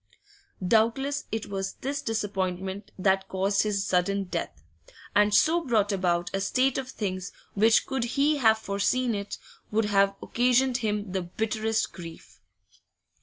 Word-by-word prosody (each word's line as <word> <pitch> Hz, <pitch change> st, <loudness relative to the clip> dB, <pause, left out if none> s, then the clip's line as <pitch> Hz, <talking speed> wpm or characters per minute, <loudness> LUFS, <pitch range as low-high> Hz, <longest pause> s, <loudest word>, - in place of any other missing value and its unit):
Doubtless 235 Hz, +7 st, +2 dB
it 220 Hz, 0 st, -2 dB
was 195 Hz, -1 st, -4 dB
this 280 Hz, +2 st, -4 dB
disappointment 195 Hz, -4 st, -3 dB
that 190 Hz, 0 st, +2 dB
caused 195 Hz, +1 st, +1 dB
his 205 Hz, -2 st, 0 dB
sudden 195 Hz, +2 st, +1 dB
death, 170 Hz, -, -5 dB, 0.5 s
and 210 Hz, 0 st, +5 dB
so 325 Hz, +10 st, +4 dB
brought 220 Hz, -6 st, +2 dB
about 175 Hz, -3 st, 0 dB
a 195 Hz, -, -1 dB
state 255 Hz, +6 st, +1 dB
of 260 Hz, -1 st, -6 dB
things 185 Hz, -5 st, -4 dB, 0.2 s
which 220 Hz, +2 st, +4 dB
could 265 Hz, -3 st, -2 dB
he 295 Hz, +2 st, +3 dB
have 220 Hz, -5 st, +4 dB
foreseen 220 Hz, +4 st, 0 dB
it, 200 Hz, -1 st, -4 dB, 0.3 s
would 215 Hz, +1 st, +1 dB
have 200 Hz, -1 st, +3 dB
occasioned 250 Hz, +1 st, +2 dB
him 210 Hz, -4 st, -2 dB
the 190 Hz, 0 st, -1 dB
bitterest 220 Hz, +4 st, -1 dB
grief. 170 Hz, -2 st, -11 dB
210 Hz, 140 wpm, -27 LUFS, 195-235 Hz, 0.5 s, and